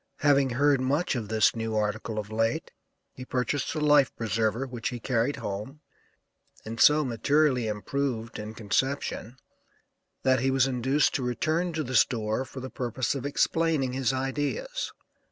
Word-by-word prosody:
Having 140 -3 +4
heard 140 +1 +3
much 145 +7 +1
of 115 -5 -4
this 110 0 +3
new 115 -1 -3
article 110 +1 -2
of 105 0 -4
late, 115 +1 -1 0.4
he 130 - -9
purchased 130 +3 -2
a - - -1
life 150 -3 +4
preserver 115 +2 0
which 125 -3 -4
he 120 - -6
carried 120 +3 0
home 105 +9 -6 0.8
and 115 +1 -6
so 150 0 +6
materially 130 +1 +2
improved, 115 +2 -3
in 105 +1 -7
conception, 125 +2 -2 0.9
that 130 -1 +3
he 130 +3 +1
was 135 -1 +3
induced 135 +3 +1
to - - -1
return 155 +8 0
to 155 0 -1
the 130 -1 -6
store 110 +1 +2
for 130 +1 -9
the 130 - -7
purpose 125 -1 -2
of 140 0 -3
explaining 150 -2 +1
his 130 -1 +1
ideas. 145 - -2
130 Hz, 155 wpm, -27 LUFS, 115-140 Hz, 0.9 s, so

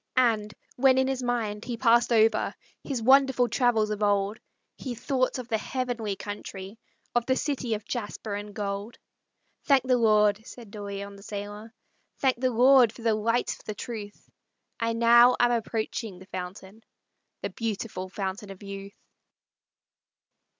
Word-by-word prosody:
And, 220 -4 +2 0.3
when 260 0 +5
in 265 0 +3
his 265 -1 -1
mind 230 -4 -2
he 240 -2 -4
passed 235 +1 +4
over 220 -1 +3 0.3
His 260 -5 -3
wonderful 265 -1 +5
travels 235 -3 +2
of 210 0 -3
old, 205 +1 +1 0.4
He 255 -3 -6
thought 255 +2 0
of 250 -2 -6
the 225 -3 0
heavenly 240 -5 -3
country, 205 0 -7 0.3
Of 240 -1 +1
the 260 - +3
city 260 -5 -1
of 210 0 -8
jasper 215 -2 -4
and 205 0 -6
gold. 200 +2 -4 0.7
"Thank 275 -3 +4
the 255 -1 +2
Lord!" 210 -2 +4
said 230 -2 -12
De 210 - -8
Leon, 200 0 -6
the - - -14
sailor, 205 +2 -7 0.5
"Thank 260 -3 +1
the 255 - +3
Lord 250 0 +6
for 230 - -13
the 225 -1 +3
light 230 +3 0
of - - -20
the 215 - -5
truth, 210 -2 -7 0.5
I 230 0 0
now 235 +2 +6
am 240 0 +4
approaching 225 -3 -2
the 185 - -13
fountain, 190 +3 -8 0.6
The - - -2
beautiful 210 -4 -4
Fountain 195 +2 -4
of 195 0 -10
Youth." 200 0 -8
225 Hz, 155 wpm, -27 LUFS, 205-245 Hz, 0.7 s, Lord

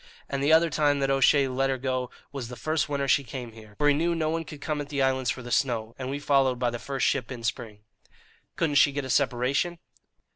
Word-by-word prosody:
And 140 -1 -3
the 145 +2 +2
other 165 +1 +5
time 145 -1 +2
that 135 0 +1
O'Shea 135 +1 +4
let 135 +1 0
her 135 - 0
go 130 -1 -2 0.2
was 135 -4 -5
the 125 - -8
first 155 +5 -1
winter 140 -1 -1
she 140 +1 +3
came 125 -2 -7
here, 110 -2 -15
for 145 - +2
he 145 - +5
knew 170 +4 +1
no 155 -1 0
one 165 0 -2
could 150 0 -10
come 150 0 -2
at 145 - -8
the 145 -1 -3
islands 130 -2 +1
for 125 - -3
the 125 - -8
snow, 115 -5 0
and 130 0 -4
we 140 - -2
followed 135 -3 +2
by 120 -1 0
the 120 - -5
first 135 +3 -2
ship 130 -3 0
in 120 -2 -7
spring." 110 -2 -4 0.7
"Couldn't 155 -3 0
she 145 - +5
get 145 -1 -3
a 130 - -3
separation?" 135 +6 +1
135 Hz, 250 wpm, -27 LUFS, 125-145 Hz, 0.7 s, other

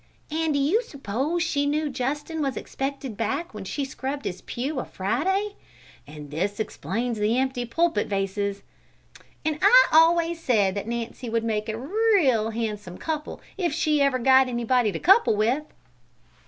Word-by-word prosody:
("And 315 -1 0
do - - +2
you 320 +12 +2
s'pose 280 - -2
she 285 -3 0
knew 300 +1 0
Justin 295 +4 -3
was 275 -3 -1
expected 270 -3 -4
back 230 +10 -2
when 210 -2 -7
she 280 +8 -3
scrubbed 270 +1 -5
his 180 0 -4
pew 265 +3 -3
a - - -2
Friday?") 380 - -1 0.5
("And 150 -1 -10
this 195 +7 -2
explains 220 +4 -3
the 215 +3 +1
empty 260 -2 -1
pulpit 320 -1 +1
vases!") 200 0 -2 0.8
("And 310 -1 -1
I - - +7
always 330 +1 +4
said 205 -9 +2
that 200 +2 -4
Nancy 235 +1 -4
would 230 0 0
make 215 -1 -2
a 220 - -3
real 295 - +2
handsome 210 -5 -4
couple 310 -2 -4 0.2
if 345 -5 0
she 305 -2 +1
ever 275 -2 +3
got 260 +1 +5
anybody 240 -2 +1
to - - -4
couple 385 - +5
with!") 240 +8 +1
260 Hz, 160 wpm, -25 LUFS, 215-305 Hz, 0.8 s, I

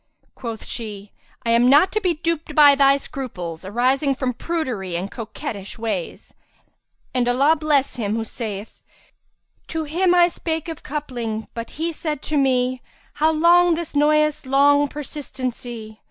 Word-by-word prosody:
Quoth 230 -3 -7
she, 210 -3 -6 0.3
"I 230 - +1
am 235 +2 +5
not 300 +7 +6
to 430 - -1
be 360 -4 +1
duped 320 -1 -3
by 290 -2 +8
thy 275 0 +5
scruples, 180 -13 -6
arising 255 +7 +1
from 255 -1 -2
prudery 245 - -3
and 190 +3 -5
coquettish 225 -2 -6
ways; 215 -6 -4 0.8
and 245 -1 +1
Allah 275 +6 +4
bless 295 -4 +1
him 215 -2 -1
who 225 - -1
saith, 215 -2 -6 0.9
'To 320 -1 -3
him 350 +4 +2
I 350 -1 +6
spake 325 -2 -4
of 325 -2 -6
coupling, 240 -7 -4
but 230 0 -6
he 330 +2 -1
said 305 -3 -4
to 310 - -3
me, 255 -2 +1 0.2
* - - -33
How 315 - +5
long 340 +2 +5
this 335 -1 -5
noyous 305 -1 +2
long 285 +2 +4
persistency?' 255 -6 -6
275 Hz, 155 wpm, -22 LUFS, 230-305 Hz, 0.9 s, by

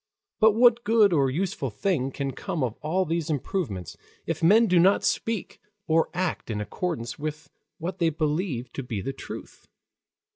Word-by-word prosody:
But 220 -1 +6
what 235 +1 +5
good 215 -3 +4
or 140 -4 +3
useful 150 -2 -2
thing 135 - -1
can 135 0 -3
come 155 +2 -3
of 120 -3 -2
all 180 +5 0
these 165 -1 -2
improvements, 120 - -3 0.3
if 165 -2 -3
men 210 +8 +6
do 180 -4 +4
not 190 +4 +4
speak 225 -4 -2 0.3
and 160 0 +4
act 180 -7 -2
in 105 -2 -2
accordance 120 - -4
with 155 +1 -5 0.3
what 175 +4 -5
they 165 -2 +3
believe 155 -4 -2
to - - -4
be 120 -5 -4
the 135 - -4
truth? - - -10
160 Hz, 170 wpm, -26 LUFS, 135-190 Hz, 0.3 s, But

